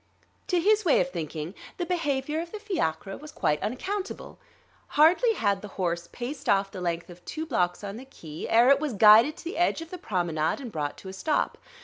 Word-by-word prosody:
To 360 - +2
his 425 +4 +3
way 325 -7 +4
of 270 - 0
thinking 160 - -5 0.2
the 350 - -2
behavior 300 -3 -1
of 340 0 -8
the - - -5
fiacre 195 - -2
was 305 +1 -11
quite 150 - 0
unaccountable. 375 - -4 0.6
Hardly 360 +10 +5
had 200 - 0
the 210 - -7
horse 170 -2 -2
paced 250 +4 -5
off 195 -1 +3
the 185 - -7
length 170 0 -3
of 175 0 -14
two 315 - -5
blocks 180 - 0
on 200 +1 -5
the 260 - -9
Quai 160 - -8
ere 235 +3 +6
it 280 - +5
was 300 -4 -2
guided 220 +8 +7
to - - -11
the 340 0 -5
edge 350 - +2
of 330 0 -9
the 365 - -6
promenade 170 - -1
and 250 -5 -7
brought 145 -4 -3
to 190 - -9
a - - -8
stop. 295 +11 -1
240 Hz, 215 wpm, -27 LUFS, -, 0.6 s, guided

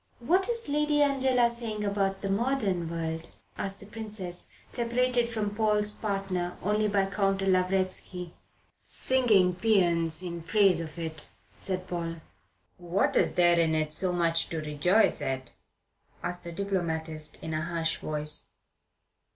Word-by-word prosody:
"What 365 - +2
is 465 -1 -2
Lady 295 0 +2
Angela 260 -3 +3
saying 225 -3 -4
about 195 -1 0
the 195 - -2
modern 200 -7 0
world?" 165 -1 -3 0.3
asked 195 0 -4
the - - -9
Princess, 205 -4 -5 0.2
separated 240 0 +1
from 215 -3 -2
Paul's 210 -1 +1
partner 195 -4 -3
only 210 +2 +2
by 200 -1 +2
Count 195 0 0
Lavretsky. 185 -1 0 0.5
"Singing 215 -9 +3
paeans 175 -5 +2
in 170 -1 -5
praise 195 0 +3
of 160 -1 -7
it," 160 -2 -6 0.3
said 185 - -2
Paul. 170 -1 -3 0.6
"What 175 +2 0
is - - +3
there 175 -1 +4
in 160 -1 +2
it 155 -1 0
so 185 +3 +3
much 165 -1 +1
to 165 - -4
rejoice 155 +7 +2
at?" 130 -1 -3 0.7
asked 175 0 -4
the 170 - -5
diplomatist, 165 -4 -2
in 160 - -4
a 155 - -1
harsh 165 -1 -1
voice. 150 0 +2
185 Hz, 140 wpm, -28 LUFS, 170-215 Hz, 0.7 s, there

